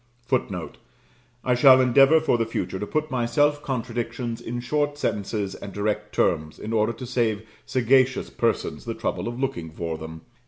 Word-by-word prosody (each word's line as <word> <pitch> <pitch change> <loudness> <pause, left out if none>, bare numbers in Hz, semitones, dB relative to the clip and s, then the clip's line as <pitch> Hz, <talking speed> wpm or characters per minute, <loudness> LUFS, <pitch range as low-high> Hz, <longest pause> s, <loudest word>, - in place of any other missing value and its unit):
[Footnote: 100 -10 -2 0.6
I 125 - +2
shall 130 +1 +7
endeavour 135 +5 +6
for 155 -6 +1
the 115 - +2
future 95 -4 -3
to 105 - -4
put 155 +3 -2
my 120 -2 0
self 145 +4 +2
contradictions 120 -2 -3
in 120 +1 -4
short 145 +3 -1
sentences 100 -6 -2
and 100 - -8
direct 105 +1 -2
terms, 75 0 +1
in 110 - -5
order 110 0 +2
to 125 - -8
save 110 -3 -1 0.2
sagacious 130 +1 +2
persons - - -1
the - - -3
trouble - - -3
of 120 +1 -5
looking 85 -12 -2
for 80 0 -5
them. 80 0 -8
120 Hz, 170 wpm, -24 LUFS, 105-130 Hz, 0.6 s, shall